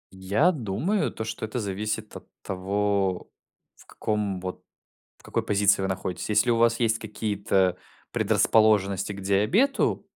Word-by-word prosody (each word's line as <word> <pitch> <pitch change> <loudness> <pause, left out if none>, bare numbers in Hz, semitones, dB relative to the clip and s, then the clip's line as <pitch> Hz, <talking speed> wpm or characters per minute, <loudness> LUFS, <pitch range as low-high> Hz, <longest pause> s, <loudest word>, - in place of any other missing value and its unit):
Я 100 - +2
думаю 140 - -1
то, - - -5
что 110 - -6
это 110 +3 -3
зависит 105 +1 -4
от - - -10 0.2
того, 95 0 -1 0.4
в - - -19
каком 105 -3 -2
вот, 90 0 -6 0.5
в - - -25
какой - - -2
позиции 100 -1 +3
вы 95 - 0
находитесь. 95 0 -4
Если 105 +3 +3
у 115 - +2
вас 115 0 +3
есть 115 -2 +1
какие-то 100 -4 0 0.3
предрасположенности 105 -3 +2
к 100 - -8
диабету, 105 - +2
105 Hz, 140 wpm, -26 LUFS, 95-110 Hz, 0.5 s, позиции